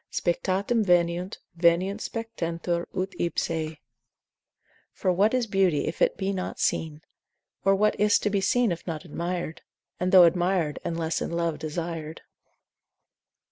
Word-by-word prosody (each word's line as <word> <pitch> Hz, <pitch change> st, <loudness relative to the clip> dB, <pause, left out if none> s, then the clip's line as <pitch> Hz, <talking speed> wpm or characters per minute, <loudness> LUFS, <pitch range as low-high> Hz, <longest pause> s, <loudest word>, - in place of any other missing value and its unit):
Spectatum 195 Hz, +6 st, 0 dB
veniunt, 175 Hz, 0 st, +1 dB, 0.2 s
veniunt 175 Hz, +5 st, +2 dB
spectentur 170 Hz, -6 st, -3 dB
ut 190 Hz, +1 st, -1 dB
ipsae. 160 Hz, -2 st, -2 dB, 1.1 s
For 185 Hz, -, 0 dB
what 205 Hz, +7 st, +3 dB
is 250 Hz, -2 st, +1 dB
beauty 190 Hz, -8 st, +2 dB
if 160 Hz, -, -5 dB
it -, -, +3 dB
be 195 Hz, 0 st, -1 dB
not 185 Hz, -1 st, -4 dB
seen, 155 Hz, -1 st, -1 dB, 0.6 s
Or 195 Hz, +1 st, +4 dB
what 210 Hz, +1 st, +1 dB
is't 210 Hz, 0 st, +4 dB
to 210 Hz, -, +1 dB
be 200 Hz, -1 st, +1 dB
seen 240 Hz, +2 st, +2 dB
if 170 Hz, +1 st, -5 dB
not 165 Hz, +1 st, -4 dB
admir'd, 170 Hz, 0 st, -4 dB, 0.4 s
And 180 Hz, +1 st, 0 dB
though 185 Hz, -2 st, +9 dB
admir'd, 175 Hz, -2 st, +1 dB
unless 165 Hz, -1 st, -2 dB
in -, -, -2 dB
love 170 Hz, -2 st, -1 dB
desir'd? 160 Hz, 0 st, -5 dB
175 Hz, 140 wpm, -26 LUFS, 165-195 Hz, 1.1 s, though